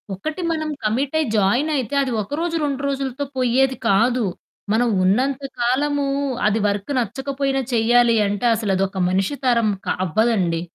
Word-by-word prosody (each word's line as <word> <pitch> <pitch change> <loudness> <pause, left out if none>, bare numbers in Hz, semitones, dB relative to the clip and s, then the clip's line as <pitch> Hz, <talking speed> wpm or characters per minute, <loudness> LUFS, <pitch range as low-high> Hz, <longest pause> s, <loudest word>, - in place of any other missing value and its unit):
ఒకటి 310 - -5
మనం 310 -1 -2
కమిటయి 275 +8 0
జాయినయితే, 255 +6 +1
అది 260 - -3
ఒకరోజు, 325 - -3
2 280 -1 -2
రోజులుతో 275 0 -3
పొయ్యేది 255 +1 +2
కాదు. 235 +4 +3 0.5
మనం 240 +2 +2 0.2
ఉన్నంత 260 +8 +1 0.2
కాలమూ 280 +4 +1 0.4
అది 215 +1 +1
వర్కు 200 +7 -2
నచ్చకపోయినా, 270 +3 -2
చెయ్యాలి 235 +1 +4
అంటే, 205 +4 -2
అసలదొక 195 -3 -1
మనిషి 195 +9 0
తరం 235 -3 +3 0.2
క - - -11 0.2
అవ్వదండి. 185 -4 +1
245 Hz, 130 wpm, -21 LUFS, 215-275 Hz, 0.5 s, చెయ్యాలి